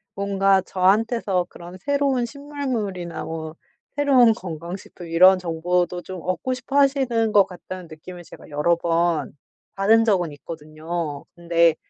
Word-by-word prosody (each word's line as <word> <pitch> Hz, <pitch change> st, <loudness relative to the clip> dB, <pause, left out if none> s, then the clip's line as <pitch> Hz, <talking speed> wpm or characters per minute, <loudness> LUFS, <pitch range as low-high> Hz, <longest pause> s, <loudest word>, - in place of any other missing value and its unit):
뭔가 195 Hz, -1 st, +2 dB
'저한테서 195 Hz, 0 st, +1 dB
그런 175 Hz, +1 st, -11 dB
새로운 275 Hz, +1 st, +1 dB
신문물이나 240 Hz, -, -4 dB
뭐 160 Hz, -1 st, -6 dB, 0.4 s
새로운 260 Hz, -6 st, +5 dB
건강 170 Hz, -2 st, -6 dB
식품 180 Hz, -2 st, -12 dB
이런 185 Hz, +3 st, +6 dB
정보도 175 Hz, +1 st, -1 dB
좀 185 Hz, -1 st, -8 dB
얻고 220 Hz, +8 st, -2 dB
싶어 260 Hz, +2 st, -3 dB
하시는 265 Hz, -5 st, +2 dB
것 205 Hz, -2 st, +6 dB
같다.'는 180 Hz, 0 st, -9 dB
느낌을 175 Hz, +3 st, -11 dB
제가 -, -, -14 dB
여러 150 Hz, +4 st, +2 dB
번 170 Hz, -2 st, 0 dB, 0.4 s
받은 220 Hz, +3 st, +4 dB
적은 180 Hz, -7 st, +1 dB
있거든요. 155 Hz, 0 st, -6 dB
근데 170 Hz, -1 st, +3 dB
185 Hz, 300 characters per minute, -23 LUFS, 170-225 Hz, 0.4 s, 이런